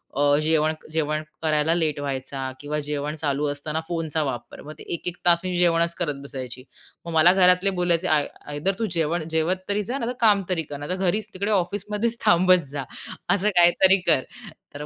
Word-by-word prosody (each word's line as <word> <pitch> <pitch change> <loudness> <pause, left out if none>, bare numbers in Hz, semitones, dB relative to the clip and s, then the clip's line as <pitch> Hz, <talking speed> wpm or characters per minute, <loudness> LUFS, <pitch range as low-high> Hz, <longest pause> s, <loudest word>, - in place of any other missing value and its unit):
अ, 145 +1 +3
जेवण 155 0 +2 0.2
जेवण 155 -1 -1 0.2
करायला 155 0 +2
लेट 155 -4 0
व्हायचा 135 -1 -4
किंवा 150 +1 -3
जेवण 150 +1 -3
चालू 145 -1 -1
असताना 150 +2 -4
फोनचा 165 -2 -2
वापर, 130 -4 -5
मग 150 - -9
ते - - -9
एक-एक 175 +1 -4
तास 170 -1 +4
मी 185 -1 -2
जेवणच 170 -1 +2
करत 150 -5 -1
बसायची. 130 -2 -7 0.4
मग 170 - -5
मला 165 +3 +6
घरातले 180 0 +5
बोलायचे 175 0 +1
आय 150 -3 +2 0.2
आयदर 145 +7 0
तू 225 - 0
जेवण 165 -1 -1
जेवत 165 +4 0
तरी 205 +1 0
जा, 245 +7 -3
नाहीतर 245 -1 -3
काम 210 -3 +4
तरी 165 -3 0
कर. 145 -1 -7
नाहीतर 145 +6 -4
घरीच 215 +3 -1
तिकडे 200 +3 -2
ऑफिसमध्येच 210 +4 -1
थांबत 180 0 +5
जा. 145 -2 -4 0.5
असं 205 +2 +1
काहीतरी 185 +2 +5
कर, 155 -5 +4 0.5
तर 145 +1 -6
165 Hz, 180 wpm, -24 LUFS, 150-185 Hz, 0.5 s, मला